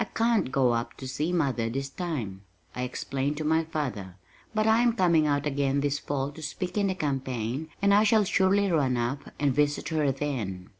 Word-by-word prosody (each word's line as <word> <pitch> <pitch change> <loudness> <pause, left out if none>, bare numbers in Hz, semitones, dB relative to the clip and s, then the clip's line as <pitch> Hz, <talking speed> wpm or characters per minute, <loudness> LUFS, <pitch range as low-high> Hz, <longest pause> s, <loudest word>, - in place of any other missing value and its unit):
"I - - +1
can't 230 - +1
go 130 -3 +3
up 115 0 -2
to 130 - -7
see 150 +6 -2
mother 135 -9 0
this 135 +3 -3
time," 135 - -4 0.3
I 125 - -3
explained 135 +3 -2
to 155 - -3
my 160 +1 +2
father, 125 - -4 0.4
"but 215 -1 +1
I 220 +1 +4
am 240 -1 +3
coming 170 -7 +3
out 145 0 +1
again 140 -1 +1
this 145 0 0
fall 140 0 -2
to 160 - -11
speak 165 +4 -4
in 205 -1 +2
the 190 - -1
campaign 135 - -2
and 200 0 +5
I 205 +1 +6
shall 220 0 +4
surely 195 +1 +2
run 135 -6 +2
up 120 +4 -2
and 145 -2 +2
visit 145 +2 +1
her 155 -4 +1
then." 115 -11 -4
145 Hz, 205 wpm, -27 LUFS, 130-175 Hz, 0.4 s, I